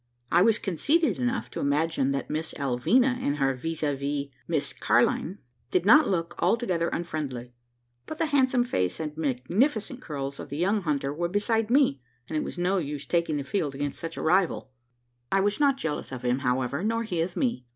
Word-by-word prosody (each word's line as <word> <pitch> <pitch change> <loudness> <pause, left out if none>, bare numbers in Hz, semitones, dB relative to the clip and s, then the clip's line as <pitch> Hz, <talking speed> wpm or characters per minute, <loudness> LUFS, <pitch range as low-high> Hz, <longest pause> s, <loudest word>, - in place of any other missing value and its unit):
I 175 - +5
was 215 +2 +5
conceited 250 - +1
enough 120 -1 -1
to - - -5
imagine 145 -1 +1
that 140 0 -2
Miss 155 +1 -3
Alvina, 170 - +2
and 145 +1 0
her 135 -1 +2
vis 160 +5 -4
a 145 -2 +1
vis, 140 +1 -3 0.2
Miss 160 -4 0
Car'line, 160 - +1 0.3
did 180 +4 +1
not 300 +7 +7
look 170 -2 -1
altogether 180 -3 +1
unfriendly; 140 -8 -4 0.5
but 315 - -6
the 325 - +1
handsome 265 -4 +3
face 90 - -1
and 150 -2 -4
magnificent 195 - 0
curls 140 -3 -5
of - - -7
the 140 - -5
young 200 +5 +1
hunter 140 -4 -1
were 170 +3 -2
beside 215 +3 +1
me; 245 - +3 0.3
and 160 - -5
it 155 - 0
was - - -6
no 185 +2 +1
use 145 -3 -4
taking 170 -3 0
the 140 - -2
field 145 -3 -2
against 145 0 -3
such 165 0 -6
a - - -4
rival. 175 -5 +1 0.6
I 195 - +3
was 205 +4 +1
not 280 -2 +3
jealous 155 - -3
of 125 -1 -6
him, 125 +2 +1
however, 130 +4 -1
nor 230 +2 0
he 180 -7 -2
of 175 +2 -3
me. 235 - -1
165 Hz, 195 wpm, -27 LUFS, 140-205 Hz, 0.6 s, not